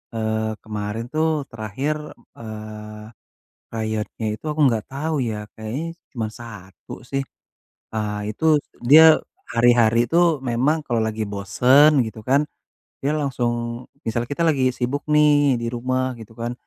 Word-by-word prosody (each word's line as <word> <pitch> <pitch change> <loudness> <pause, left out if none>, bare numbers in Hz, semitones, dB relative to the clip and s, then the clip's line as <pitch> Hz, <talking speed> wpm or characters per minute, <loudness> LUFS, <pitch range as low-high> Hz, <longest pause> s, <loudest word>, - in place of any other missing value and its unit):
eee, 110 0 -1
kemarin 105 +1 -4
tuh 155 +1 +2 0.2
terakhir, 115 +7 -3 0.4
eee, 110 -1 -8 0.6
krayonnya 110 0 -3
itu - - -16
aku 150 - -5
enggak 115 -4 0
tahu 155 +4 -2
ya 105 -1 -5
kayaknya 110 +7 -4 0.3
cuman 115 -4 -3
1 100 -6 -12 0.2
sih, 135 +1 -1 0.7
eee, 105 -1 -2
itu 135 - -7 0.4
dia 155 +6 +8 0.3
hari-hari 115 -1 +4
tuh 170 -2 +4
memang 130 +7 +2
kalau 120 -2 0
lagi 110 0 -2
bosen 125 +9 +4 0.2
gitu 110 0 -8
kan, 140 +3 +4 0.6
dia 140 - 0
langsung 130 -5 -1 0.5
misal 115 +1 -1
kita 145 - -3
lagi 135 -5 +3
sibuk 130 +3 -2
nih 145 -3 +4
di - - -3
rumah 130 +1 -1
gitu 110 -1 -11
kan 120 +1 -3
120 Hz, 135 wpm, -22 LUFS, 110-140 Hz, 0.7 s, dia